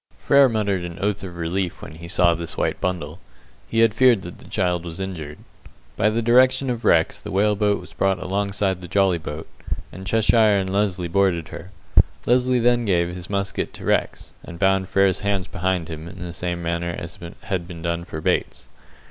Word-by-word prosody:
Frere 140 -1 +5
muttered 100 -5 0
an 85 -1 -6
oath 100 +1 -1
of 90 -2 -7
relief 85 +2 -2
when - - -8
he 80 +2 -10
saw 85 -1 +3
this 85 0 -5
white - - -1
bundle. 90 -2 -3 0.5
He 115 - +1
had 115 -2 +4
feared 120 -3 +4
that 90 - -9
the - - -15
child 90 -4 0
was 85 0 -7
injured. 80 -6 -5 0.6
By 105 - +3
the 115 +2 -1
direction 130 +2 +4
of 120 -1 -4
Rex 80 -1 +3
the - - -8
whale 105 +2 +2
boat 105 0 +1
was 90 - -13
brought 95 -1 +1
alongside 100 -1 -1
the 90 - -8
jolly 95 -1 +2
boat, 80 0 -7 0.4
and 95 +2 -9
Cheshire 110 0 +4
and 95 -1 -1
Lesly 95 -3 0
boarded 85 -3 +1
her. 85 +2 -9 0.6
Lesly 125 +1 +3
then 120 0 +3
gave 85 -5 +1
his 90 0 -8
musket 100 -1 -2
to - - -9
Rex, - - -1
and 85 - -9
bound 95 0 +2
Frere's 95 -1 +3
hands 100 -2 -1
behind 90 -2 -2
him, 80 0 -7
in 90 +2 -10
the 85 -1 -6
same 85 -1 -3
manner 85 0 -2
as 85 0 -8 0.2
had 90 -3 -3
been 85 -2 -9
done 85 0 -1
for 80 -2 -7
Bates. - - -1
95 Hz, 200 wpm, -22 LUFS, 85-100 Hz, 0.6 s, Frere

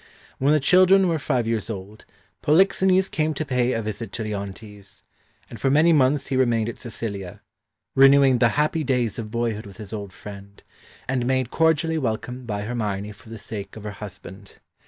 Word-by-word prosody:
When 140 +2 +3
the 155 - +4
children 185 +6 +5
were 165 -2 0
five 125 -4 0
years 115 -1 -2
old, 105 0 -8 0.4
Polixenes 190 +3 +3
came 155 -2 -1
to 155 - -3
pay 125 -3 +1
a 115 - -2
visit 110 0 -5
to 115 - -3
Leontes, 100 -1 -7 0.4
and 115 - -11
for 135 - +2
many 155 +5 +5
months 140 -1 +3
he 135 - -1
remained 120 -3 +2
in 120 - -6
Sicilia, 105 -5 -6 0.5
renewing 135 -1 +6
the 120 - +5
happy 155 +1 +1
days 125 -6 0
of 110 -2 -5
boyhood 115 -2 -2
with 100 -2 -13
his 105 -1 -9
old 100 -3 -5
friend, 100 0 -12 0.4
and 125 -2 -1
made 130 -2 0
cordially 160 0 +2
welcome 125 0 -4
by 105 -2 -3
Hermione 105 -3 -3
for 105 +1 -16
the 115 - -7
sake 100 -2 -7
of 110 - -9
her 105 - -5
husband. 100 -1 -11
120 Hz, 180 wpm, -23 LUFS, 105-140 Hz, 0.5 s, renewing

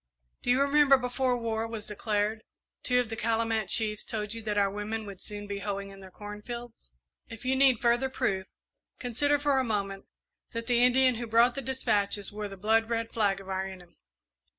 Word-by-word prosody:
Do - - -4
you 250 +2 +4
remember, 280 -1 +5
before 250 0 0
war 225 -1 -2
was 225 -2 -6
declared, 210 +1 -1 0.4
two 250 -1 +2
of 245 -3 -1
the - - -2
Calumet 225 -1 0
chiefs 215 -2 +1
told 210 -1 -3
you 230 - -5
that 210 -1 -2
our 200 -1 +3
women 210 +2 -4
would 200 -2 -9
soon 205 0 -6
be 200 -1 -4
hoeing 200 -1 -4
in 195 - -12
their 190 -1 -11
corn 205 +2 -9
fields? 235 - -9 0.3
If 225 +2 -10
you 260 +1 +2
need 265 -3 +5
further 240 +2 +2
proof, 190 -6 -1 0.5
consider 285 +4 +1
for 285 -2 +2
a - - +2
moment 200 -4 -2 0.5
that 230 0 -3
the 240 -1 +3
Indian 250 0 +5
who 240 - -4
brought 230 +2 +5
the 275 - -4
despatches 210 -6 0
wore 210 0 -4
the 195 -1 -10
blood 220 +3 +2
red 230 -1 -1
flag 200 -4 +1
of 195 - -12
our 190 0 -2
enemy. 180 -2 -12
225 Hz, 200 wpm, -29 LUFS, 205-245 Hz, 0.5 s, remember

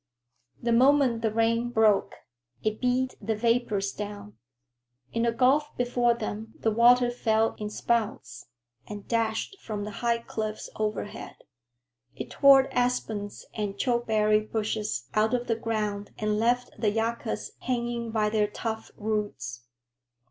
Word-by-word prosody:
The 235 - -1
moment 255 -1 +4
the 220 -1 +1
rain 230 +2 +1
broke, 220 -4 +3 0.5
it 215 0 -1
beat 255 +1 +1
the 220 - -1
vapors 215 -3 +1
down. 205 0 -7 0.8
In 230 - 0
the 235 0 +2
gulf 265 +6 +2
before 245 -1 +2
them 220 -1 -6
the 225 - +1
water 240 +2 +5
fell 225 -2 +1
in 210 -1 -3
spouts, 235 +3 -2 0.4
and 205 -1 -8
dashed 230 - -1
from 210 -2 -5
the 210 - -5
high 235 -1 +2
cliffs 215 -2 -5
overhead. 210 -1 -4 0.8
It - - -7
tore 275 -1 +6
aspens 225 -5 -1
and 205 -2 -3
chokecherry 220 -3 +2
bushes 215 - -3
out 220 +3 +2
of 245 0 -2
the 230 - 0
ground 210 -3 -3
and 215 0 0
left 245 +2 +1
the 215 -1 +2
yuccas 225 +1 -2
hanging 235 -2 -2
by 215 -1 +1
their 210 -1 +2
tough 220 +1 -5
roots. 205 - -3
225 Hz, 135 wpm, -27 LUFS, 210-240 Hz, 0.8 s, tore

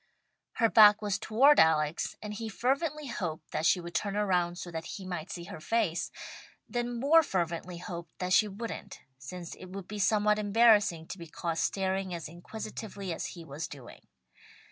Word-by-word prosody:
Her 230 - +3
back 210 -1 +8
was 205 -2 0
toward 270 +7 +5
Alex, 155 0 +3
and 210 0 -5
he 225 +1 -5
fervently 285 - -1
hoped 175 - -5
that 160 - +1
she - - +4
would 170 0 -8
turn 200 -1 -1
around 180 -4 +1
so 175 - -7
that 165 -1 -5
he 195 - -9
might 175 -1 -5
see 175 -4 -6
her 170 - -8
face, 200 -2 0 0.6
then 240 0 -2
more 305 +6 +6
fervently 175 - -2
hoped 170 -1 -8
that 185 0 -1
she 215 - +5
wouldn't, 215 +3 -7 0.2
since 170 +5 -8
it - - -10
would 190 0 -8
be 210 0 -6
somewhat 210 +1 +3
embarrassing 205 -5 +4
to 185 - -8
be 170 - -8
caught 165 +1 -3
staring 190 -1 -1
as 170 - -6
inquisitively 200 +2 -6
as - - -4
he 165 - -9
was 150 +1 -5
doing. 135 -4 -12
190 Hz, 180 wpm, -30 LUFS, 170-215 Hz, 0.6 s, back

